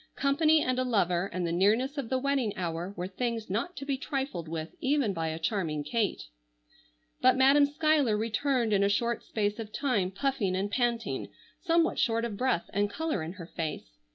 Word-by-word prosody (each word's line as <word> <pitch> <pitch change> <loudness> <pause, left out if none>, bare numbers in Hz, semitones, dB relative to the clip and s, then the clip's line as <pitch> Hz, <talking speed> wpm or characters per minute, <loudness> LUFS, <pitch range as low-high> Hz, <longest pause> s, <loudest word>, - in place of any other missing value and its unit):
Company 305 +3 +3
and 255 0 0
a - - +2
lover 195 -6 +1
and 180 0 -2
the 170 - -1
nearness 215 - +2
of 275 -6 -4
the 260 - +1
wedding 265 -5 0
hour 175 0 -3
were 175 - -2
things 225 +1 -3
not 235 - -2
to 275 - -5
be 275 -2 -1
trifled 270 - -3
with 160 0 -5
even 270 -6 +1
by 165 -2 -2
a 160 0 -3
charming 165 -6 -1
Kate. 210 +7 -1 1.0
But 255 0 +5
Madam 280 +2 +6
Schuyler 295 -6 +2
returned 230 +1 0
in 200 - +3
a 200 - +3
short 235 +3 0
space 210 0 -2
of 215 -2 -6
time, 215 -10 0
puffing 205 -2 -1
and 200 +2 -2
panting, 235 0 -1 0.3
somewhat 335 -1 +2
short 230 0 +1
of 225 -3 -4
breath, 200 -7 0
and 205 +1 +1
color 320 - -2
in 160 +2 -5
her 180 -3 -9
face. 155 - -6
225 Hz, 190 wpm, -29 LUFS, 185-270 Hz, 1.0 s, Madam